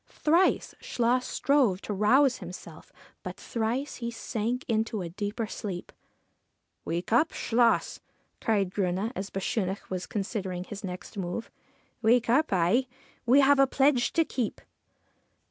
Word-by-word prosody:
Thrice 335 +5 +2
Chluas 245 +1 +1
strove 260 -10 +2
to 210 - -4
rouse 250 +7 +4
himself, 180 -1 -10 0.3
but - - -7
thrice 235 +5 -2
he 235 -1 -3
sank 235 +2 -3
into 220 -3 0
a 170 - -5
deeper 205 +5 -3
sleep. 195 -4 -6 0.5
' - - -50
Wake 170 +6 -2
up, 310 +8 +4
Chluas! 235 0 +1 0.2
' - - -43
cried 200 -4 +1
Grunne, 195 +3 -1
as 195 +1 -4
Bechunach 195 0 -3
was 185 -1 -3
con 205 - -2
sidering 190 -4 -4
his 205 0 -8
next 185 +3 -7
move. 180 +5 -4 0.2
' - - -39
Wake 235 +1 +3
up 305 +5 +3
I 195 +8 +2 0.4
We 265 +4 +7
have 275 0 +5
a 275 - +6
pledge 265 -2 +2
to 330 -1 +3
keep.' 245 -7 -3
225 Hz, 150 wpm, -28 LUFS, 195-250 Hz, 0.5 s, We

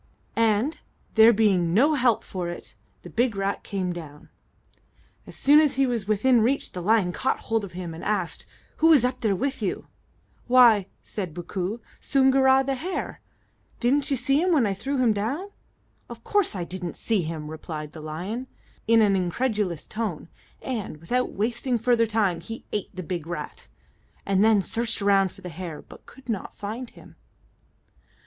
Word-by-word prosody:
and, 230 +7 +1 0.3
there 220 +1 +8
being 190 -6 +2
no 285 +8 +5
help 245 -6 +2
for 180 -2 -4
it, 175 - -9 0.3
the - - -9
big 240 -2 +1
rat 195 0 -2
came 185 -3 -2
down. 150 -4 -10 1.0
As - - -10
soon 290 +2 +6
as 300 -4 +2
he 270 +1 +3
was 235 -5 -2
within 230 +3 +3
reach, 260 +5 0
the 180 - -6
lion 195 -2 +2
caught 260 - -1
hold 225 -2 -1
of 195 - -8
him, 175 -2 -6
and 160 - -9
asked, 195 -5 -2 0.3
"Who 320 - +4
was 295 -7 +6
up 250 0 -2
there 215 -4 +1
with 270 +7 -2
you?" - - -3 0.6
"Why," 240 -6 +6 0.2
said 185 -7 -5
Bookoo, 185 +5 -4 0.2
"Soongoora, 265 -1 +4
the 275 - 0
hare. 335 +9 -4 0.6
Didn't 270 +4 +2
you 275 - +1
see 275 +4 +2
him 365 +1 +2
when 290 -8 +4
I 200 - 0
threw 265 +9 -3
him 245 -4 +3
down?" 260 - -3 0.6
"Of - - -10
course 410 - +1
I 180 - -2
didn't 180 0 -6
see 220 -4 0
him," 155 -2 -5
replied 155 -1 -6
the 160 - -10
lion, 185 +12 -5 0.4
in 225 0 +5
an 200 -2 +3
incredulous 190 - -1
tone, 210 -8 -4 0.3
and, 220 -11 -4
without 245 +11 -1
wasting 240 +4 0
further 230 0 +2
time, 210 -6 +1
he 225 0 -8
ate 210 - -3
the 185 - -7
big 170 -2 -4
rat, 175 - -6 0.6
and 195 0 +2
then 215 -3 +4
searched 230 +3 -1
around 195 -2 +3
for - - -17
the 180 - -7
hare, 165 -2 -7
but - - -16
could 260 -1 -16
not 220 -5 -4
find 225 +4 -6
him. - - -17
215 Hz, 175 wpm, -25 LUFS, 185-250 Hz, 1.0 s, there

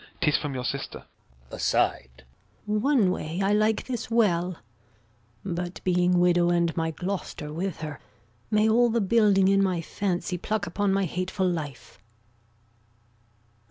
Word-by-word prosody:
'Tis 150 - +2
from 145 -3 -2
your 125 - -3
sister. 140 +2 -4 0.5
Gon. - - -7
[aside] 60 +1 0 0.4
One 215 -1 +2
way 165 -1 -4
I 195 +1 +2
like 215 +1 +2
this 240 -4 -4
well; 185 -7 +1 0.9
But 175 -1 -4
being 180 0 +2
widow, 175 0 +3
and 170 -1 +1
my 165 -1 0
Gloucester 170 -3 -5
with 175 0 -4
her, 150 -3 -6 0.5
May 215 0 +3
all 240 +2 +4
the 230 +1 +1
building 200 -2 +4
in 195 0 +4
my 185 -3 +1
fancy 180 +1 -2
pluck 210 +2 -2
Upon 200 +3 0
my 195 0 +1
hateful 185 +2 -2
life. 150 - -5
185 Hz, 140 wpm, -26 LUFS, 170-205 Hz, 0.9 s, all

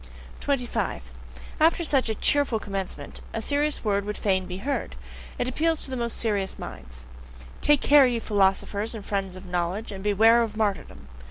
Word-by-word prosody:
25. 260 -4 -1 0.6
After 330 +2 +4
such 275 -6 +2
a 220 - -1
cheerful 285 -1 +2
commencement, 195 -8 -6
a - - -1
serious 290 +5 0
word 200 -1 +1
would 210 +1 -4
fain 190 -2 0
be 180 - -5
heard; 275 +8 -3 0.4
it 245 - -1
appeals 320 +5 0
to 265 - -6
the - - -2
most 235 -2 -2
serious 205 -4 -1
minds. 65 -1 -9 0.6
Take 295 -2 +4
care, 285 -2 +6
ye 240 -2 0
philosophers 205 +1 +1
and 210 -2 -8
friends 195 -2 -2
of 185 - -10
knowledge, 180 +5 -2
and 190 -1 -7
beware 220 +3 +5
of 220 -2 -3
martyrdom! 200 - -2
215 Hz, 170 wpm, -26 LUFS, 195-255 Hz, 0.6 s, care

